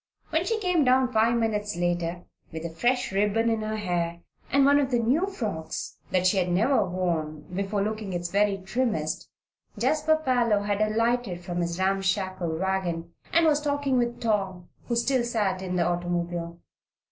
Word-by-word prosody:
When 325 Hz, +2 st, +1 dB
she 450 Hz, +1 st, 0 dB
came 360 Hz, -6 st, +2 dB
down 255 Hz, 0 st, +3 dB
five 225 Hz, +2 st, +3 dB
minutes 210 Hz, -3 st, -1 dB
later, 175 Hz, 0 st, -1 dB, 0.3 s
with 160 Hz, 0 st, -6 dB
a 170 Hz, -, -4 dB
fresh 245 Hz, +9 st, 0 dB
ribbon 210 Hz, +4 st, +2 dB
in 225 Hz, -1 st, 0 dB
her 215 Hz, 0 st, -2 dB
hair 170 Hz, -4 st, -2 dB, 0.3 s
and 275 Hz, 0 st, +5 dB
one 285 Hz, +1 st, +5 dB
of 275 Hz, -2 st, +1 dB
the 245 Hz, -, +2 dB
new 260 Hz, +11 st, +2 dB
frocks 210 Hz, -, -5 dB
that 185 Hz, 0 st, +1 dB
she 185 Hz, +2 st, +3 dB
had 180 Hz, -1 st, +1 dB
never 215 Hz, +7 st, +3 dB
worn 170 Hz, -5 st, -2 dB
before 200 Hz, +1 st, -1 dB
looking 215 Hz, -1 st, -3 dB
its 175 Hz, -1 st, -3 dB
very 200 Hz, 0 st, +2 dB
trimmest, 195 Hz, -6 st, -2 dB, 0.5 s
Jasper 310 Hz, 0 st, +2 dB
Parloe 245 Hz, -8 st, +2 dB
had 205 Hz, 0 st, -1 dB
alighted 220 Hz, -3 st, +1 dB
from 175 Hz, 0 st, -2 dB
his 170 Hz, 0 st, -2 dB
ramshackle 190 Hz, -3 st, 0 dB
wagon 175 Hz, -2 st, -2 dB, 0.2 s
and 335 Hz, 0 st, +4 dB
was 300 Hz, -2 st, +3 dB
talking 285 Hz, -3 st, +1 dB
with 240 Hz, 0 st, -1 dB
Tom, 195 Hz, -5 st, -1 dB, 0.2 s
who 235 Hz, -, 0 dB
still 240 Hz, +2 st, +2 dB
sat 210 Hz, -6 st, 0 dB
in 185 Hz, -1 st, -3 dB
the 175 Hz, -1 st, +2 dB
automobile. 175 Hz, -1 st, -2 dB
205 Hz, 170 wpm, -26 LUFS, 175-240 Hz, 0.5 s, and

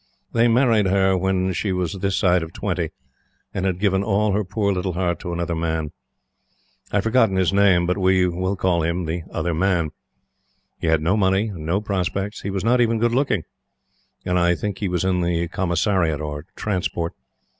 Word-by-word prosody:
They 115 Hz, 0 st, +4 dB
married 115 Hz, -4 st, +3 dB
her 95 Hz, 0 st, +3 dB
when 95 Hz, 0 st, 0 dB
she 95 Hz, +4 st, -1 dB
was 90 Hz, -3 st, -1 dB
this 95 Hz, 0 st, -1 dB
side 90 Hz, -1 st, +3 dB
of 80 Hz, +1 st, -7 dB
twenty 85 Hz, -5 st, -2 dB, 0.6 s
and 95 Hz, 0 st, -1 dB
had 90 Hz, -2 st, -1 dB
given 95 Hz, 0 st, +1 dB
all 105 Hz, 0 st, +1 dB
her 105 Hz, +2 st, +1 dB
poor 100 Hz, +1 st, 0 dB
little 90 Hz, 0 st, -2 dB
heart 85 Hz, -2 st, -1 dB
to 90 Hz, -, -5 dB
another 85 Hz, 0 st, -2 dB
man. 80 Hz, -2 st, -2 dB, 1.0 s
I -, -, -3 dB
have 100 Hz, -, +1 dB
forgotten 115 Hz, -4 st, +3 dB
his 95 Hz, 0 st, +2 dB
name, 100 Hz, -3 st, +4 dB
but 90 Hz, +3 st, 0 dB
we 95 Hz, -1 st, +3 dB
will 90 Hz, +3 st, -1 dB
call 90 Hz, -2 st, +1 dB
him 85 Hz, +2 st, -1 dB
the 80 Hz, +2 st, -3 dB
Other 85 Hz, -, -2 dB
Man. 85 Hz, -2 st, +1 dB, 0.9 s
He -, -, -2 dB
had 80 Hz, -1 st, +2 dB
no 90 Hz, +5 st, +2 dB
money 100 Hz, +1 st, +2 dB
and 80 Hz, -6 st, -7 dB
no 95 Hz, +5 st, +1 dB
prospects. 100 Hz, 0 st, -2 dB
He 100 Hz, -, -4 dB
was 95 Hz, -1 st, -2 dB
not 120 Hz, +2 st, +3 dB
even 115 Hz, -1 st, +2 dB
good 120 Hz, +1 st, +1 dB
looking; 125 Hz, -, +1 dB, 0.8 s
and 90 Hz, 0 st, +1 dB
I 85 Hz, 0 st, +3 dB
think 100 Hz, +3 st, -4 dB
he 100 Hz, -, -1 dB
was 90 Hz, +1 st, -1 dB
in 90 Hz, -1 st, +1 dB
the 85 Hz, 0 st, 0 dB
Commissariat 85 Hz, -3 st, 0 dB
or 75 Hz, 0 st, -5 dB
Transport. 90 Hz, -4 st, -2 dB
95 Hz, 195 wpm, -22 LUFS, 85-100 Hz, 1.0 s, They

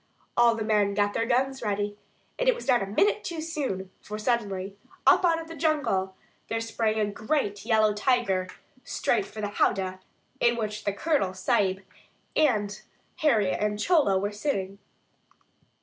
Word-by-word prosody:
All 235 Hz, -1 st, +5 dB
the 225 Hz, -, -3 dB
men 210 Hz, -2 st, +2 dB
got 205 Hz, 0 st, +1 dB
their 230 Hz, -, 0 dB
guns 265 Hz, +2 st, +1 dB
ready, 205 Hz, -1 st, -1 dB, 0.4 s
and -, -, +3 dB
it -, -, +4 dB
was -, -, -9 dB
not 245 Hz, -4 st, +4 dB
a 195 Hz, -, -2 dB
minute 410 Hz, -, +2 dB
too 335 Hz, -3 st, -4 dB
soon; 275 Hz, -, -3 dB
for, 210 Hz, -, -6 dB
suddenly, 205 Hz, -4 st, -1 dB, 0.3 s
up -, -, +6 dB
out 335 Hz, -2 st, +3 dB
of 325 Hz, -, -8 dB
the 330 Hz, -, -8 dB
jungle, 290 Hz, -, 0 dB, 0.3 s
there 225 Hz, -, -1 dB
sprang 225 Hz, -1 st, -1 dB
a 215 Hz, -, +2 dB
great 205 Hz, 0 st, -2 dB
yellow 215 Hz, -2 st, +4 dB
tiger, 210 Hz, -5 st, +1 dB, 0.4 s
straight 395 Hz, -, 0 dB
for 215 Hz, -, -8 dB
the 205 Hz, -, -2 dB
"howdah" 190 Hz, -2 st, 0 dB, 0.4 s
in 235 Hz, 0 st, +3 dB
which 215 Hz, -1 st, -4 dB
the 200 Hz, -, +2 dB
Colonel 200 Hz, -, 0 dB
Sahib 190 Hz, -3 st, +1 dB, 0.5 s
and 215 Hz, -9 st, +1 dB, 0.4 s
Harry 225 Hz, -, +3 dB
and 210 Hz, +1 st, -1 dB
Chola 290 Hz, -, +3 dB
were 200 Hz, +2 st, -1 dB
sitting. 200 Hz, -4 st, -3 dB
215 Hz, 165 wpm, -27 LUFS, 200-270 Hz, 0.5 s, up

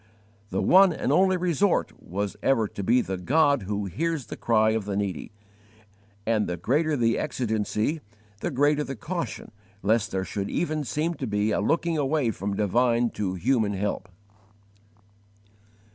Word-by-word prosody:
The 95 Hz, -, -1 dB
one 190 Hz, 0 st, +6 dB
and 145 Hz, -, -2 dB
only 185 Hz, +4 st, +4 dB
resort 180 Hz, +2 st, +1 dB
was 100 Hz, +2 st, -4 dB
ever 115 Hz, -5 st, +2 dB
to 100 Hz, -, -6 dB
be 120 Hz, +5 st, +3 dB
the 95 Hz, -4 st, -4 dB
God 145 Hz, -, +3 dB
who 100 Hz, +1 st, -3 dB
hears 150 Hz, -, -2 dB
the -, -, -7 dB
cry 110 Hz, -1 st, +2 dB
of 110 Hz, -2 st, -1 dB
the 100 Hz, -1 st, -2 dB
needy; 100 Hz, -6 st, -3 dB, 0.9 s
and 110 Hz, -2 st, +1 dB
the 90 Hz, -, -3 dB
greater 150 Hz, -, +1 dB
the 115 Hz, -2 st, +2 dB
exigency, 110 Hz, +5 st, -1 dB, 0.4 s
the -, -, -2 dB
greater 145 Hz, +3 st, +2 dB
the 135 Hz, -, -5 dB
caution 170 Hz, -, -5 dB, 0.3 s
lest 110 Hz, +2 st, +2 dB
there 95 Hz, 0 st, -2 dB
should 100 Hz, 0 st, -4 dB
even 155 Hz, -3 st, -1 dB
seem 155 Hz, +6 st, -1 dB
to 135 Hz, -6 st, -5 dB
be 105 Hz, 0 st, 0 dB
a -, -, +1 dB
looking 165 Hz, +7 st, +1 dB
away 140 Hz, -3 st, +1 dB
from 100 Hz, -1 st, -4 dB
divine 120 Hz, +3 st, +2 dB
to 95 Hz, -3 st, -3 dB
human 110 Hz, +1 st, +1 dB
help. 100 Hz, 0 st, -3 dB
115 Hz, 160 wpm, -26 LUFS, 105-150 Hz, 0.9 s, one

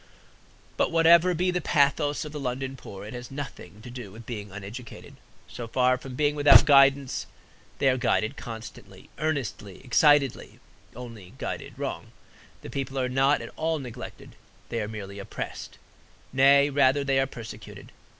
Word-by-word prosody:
But -, -, +2 dB
whatever 170 Hz, +2 st, +5 dB
be 180 Hz, +2 st, +1 dB
the 180 Hz, 0 st, -1 dB
pathos 145 Hz, +1 st, +1 dB
of 150 Hz, -, -7 dB
the 150 Hz, -, -6 dB
London 135 Hz, 0 st, -3 dB
poor, 100 Hz, -6 st, -10 dB
it 105 Hz, -, -8 dB
has 125 Hz, -1 st, -7 dB
nothing 125 Hz, -8 st, -8 dB
to 125 Hz, -, -9 dB
do 120 Hz, -5 st, -8 dB
with 115 Hz, +3 st, -12 dB
being 105 Hz, -4 st, -6 dB
uneducated. 105 Hz, +5 st, -9 dB, 0.3 s
So 120 Hz, -, -7 dB
far 125 Hz, +2 st, +2 dB
from 130 Hz, -1 st, -9 dB
being 145 Hz, +1 st, +2 dB
without 145 Hz, -4 st, +7 dB
guidance, 140 Hz, -2 st, +4 dB, 0.5 s
they 135 Hz, -, +1 dB
are 130 Hz, -1 st, +3 dB
guided 110 Hz, -2 st, 0 dB
constantly, 115 Hz, -1 st, -10 dB
earnestly, 135 Hz, -10 st, -3 dB
excitedly; 145 Hz, 0 st, +3 dB, 0.4 s
only 115 Hz, -6 st, -10 dB
guided -, -, -6 dB
wrong. -, -, -5 dB, 0.5 s
The 135 Hz, -, -3 dB
poor 135 Hz, 0 st, -3 dB
are 125 Hz, -, -1 dB
not 135 Hz, +3 st, +2 dB
at -, -, -10 dB
all 160 Hz, 0 st, -1 dB
neglected, 125 Hz, -6 st, -9 dB, 0.3 s
they 115 Hz, -, -2 dB
are 105 Hz, -, -3 dB
merely 100 Hz, -2 st, -7 dB
oppressed; 100 Hz, -, -7 dB, 0.6 s
nay, 140 Hz, +2 st, +5 dB
rather 140 Hz, 0 st, +3 dB
they 135 Hz, -1 st, +2 dB
are 135 Hz, -, +1 dB
persecuted. 115 Hz, -3 st, -10 dB
130 Hz, 160 wpm, -26 LUFS, 115-145 Hz, 0.6 s, without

